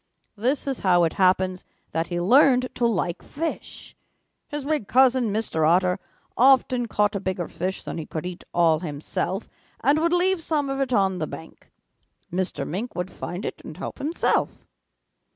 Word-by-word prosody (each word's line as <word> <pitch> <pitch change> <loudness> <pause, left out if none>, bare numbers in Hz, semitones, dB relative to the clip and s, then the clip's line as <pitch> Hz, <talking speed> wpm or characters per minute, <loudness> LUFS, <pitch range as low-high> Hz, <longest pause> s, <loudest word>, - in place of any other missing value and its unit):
This 250 +7 0
is 270 -2 -2
how 175 -2 +4
it 165 - +1
happens 185 0 +2 0.3
that 165 +1 -1
he 175 0 -2
learned 255 +6 +5
to 240 - +1
like 180 -6 -1
fish. 325 +3 -6 0.5
His 295 -2 -5
big 295 -8 -1
cousin, 255 0 +4
Mr. 205 -7 -1
Otter, 180 +1 +3 0.4
often 255 -1 +4
caught 210 0 +1
a - - 0
bigger 185 -2 -3
fish 185 +2 -4
than - - -5
he 155 - -6
could 160 +1 -5
eat 180 0 -6
all 165 -2 +3
himself 165 +5 -3 0.3
and 285 +5 +3
would 335 +1 +1
leave 360 0 +2
some 295 -4 -1
of 270 - -2
it 270 -2 -1
on 195 -5 +2
the 155 - -2
bank. 160 - -11 0.6
Mr. 175 -6 -2
Mink 210 +9 -4
would 180 +1 -3
find 180 +4 -6
it - - -5
and - - -9
help - - -6
himself. 310 +5 0
200 Hz, 170 wpm, -24 LUFS, 180-265 Hz, 0.6 s, learned